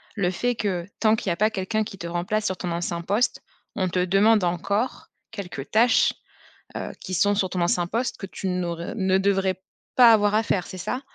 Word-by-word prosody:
le 185 -4 +1
fait 245 +6 -1
que, 185 -6 -2
tant 220 0 +4
qu'il 205 - -3
y - - +2
a - - -4
pas 215 +1 +3
quelqu'un 215 +2 -1
qui 200 -2 -9
te 170 - -6
remplace 195 +5 -1
sur 190 -3 -1
ton 180 -1 -4
ancien 170 0 -2
poste, 205 +8 0 0.3
on 190 -3 0
te 180 - -1
demande 200 +3 +4
encore 200 +7 -1 0.2
quelques 180 -10 -7
tâches, 235 +3 +4 0.6
heu, - - -4
qui 185 - -6
sont 205 +4 +3
sur 190 -2 0
ton 180 -1 -2
ancien 175 0 +1
poste, 235 +5 -2
que 195 - -6
tu 190 0 -6
n'aur 175 -2 -2
heu, - - -5
ne 190 -2 +2
devrais 190 -1 +1 0.3
pas 240 -2 +8
avoir 210 -1 +3
à 220 - +3
faire, 185 -4 -1
c'est 185 - -8
ça? 250 +8 -3
195 Hz, 220 wpm, -24 LUFS, 180-215 Hz, 0.6 s, pas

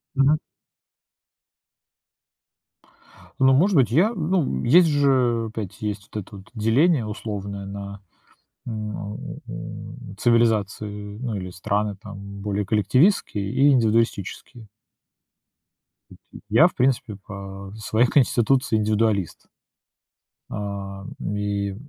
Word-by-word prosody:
Мгм. 140 +3 +4 3.0
Ну, 130 0 +5
может 185 +8 +4
быть, 125 -7 +4
я, 185 - +3
ну, 180 -1 +1
м, 65 - -2
есть 170 +7 +6
же, 130 -6 +2
опять, 105 -2 -6
есть 105 -1 -4
вот 105 - -3
это 100 +2 -13
вот 95 - -13
деление 125 +5 +3
условное 100 -2 -5
на 100 0 -7 0.7
на 105 -2 -5 0.3
у 100 - -8
цивилизации, 105 -3 0
ну 120 -3 -3
или 90 -2 -5
страны 100 +3 -1
там, 100 -1 -9 0.2
более 100 0 -2
коллективистские 110 - +2
и 140 +2 +4
индивидуалистические. 115 -1 0 1.7
У - - -9
ти - - -13
я, - - +6
в - - +2
принципе, 125 -4 0
по 95 0 -8
своей 110 +3 +2
конституции 130 -2 +2
индивидуалист. 105 -3 0 1.0
Ам, 100 -1 -5
и 100 -1 -2
105 Hz, 105 wpm, -23 LUFS, 100-125 Hz, 3.0 s, есть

